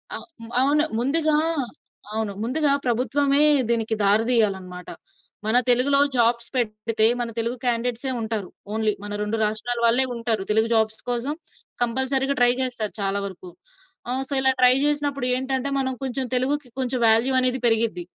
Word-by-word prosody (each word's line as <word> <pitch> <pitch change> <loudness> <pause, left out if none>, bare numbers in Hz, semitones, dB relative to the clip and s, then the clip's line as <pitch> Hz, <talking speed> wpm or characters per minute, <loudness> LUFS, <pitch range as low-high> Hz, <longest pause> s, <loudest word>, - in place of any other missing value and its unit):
ఆ! - - -3 0.4
అవును. 295 +3 +3 0.2
ముందుగా 305 +4 +1 0.8
అవును. 220 -2 -2
ముందుగా 280 +4 +1
ప్రభుత్వమే 275 +4 +1 0.3
దీనికి 225 -1 0
దారి 205 +3 +4
తీయాలన్నమాట. 190 -6 -1 0.6
మన 225 +3 +3
తెలుగులో 270 +3 +4 0.2
జాబ్స్ 235 0 +1
పెడితే 220 -1 0
మన 240 - -2
తెలుగు 235 +2 -2
క్యాండేట్సే 245 +2 -1
ఉంటారు. 220 -4 -3 0.3
ఓన్లీ 220 -1 0
మన 205 - -7
2 210 +2 -2
రాష్ట్రాల 225 +3 -2
వాళ్ళే 245 +3 +4
ఉంటారు. 230 -4 -1
తెలుగు 220 +1 +2
జాబ్స్ 220 -1 +1
కోసం 245 +5 -2 0.5
కంపల్సరీగా 265 +3 +1
ట్రై 245 0 +7
చేస్తారు 240 -5 -1
చాలా 195 +1 -1
వరకు. 185 -2 -9 0.6
ఆహ్, 260 +2 -1
సో - - -2
ఇలా 265 0 +3
ట్రై 250 0 +7
చేసినప్పుడు 290 -3 -1
ఏంటంటే 265 +1 -2
మనం 260 -1 -1
కొంచెం 265 0 -2
తెలుగుకి 275 +2 -1
కొంచెం 255 -1 -2
వాల్యూ 225 +4 +4
అనేది 255 0 +2
పెరిగిద్ది. 225 -6 +1
240 Hz, 145 wpm, -23 LUFS, 220-265 Hz, 0.8 s, ట్రై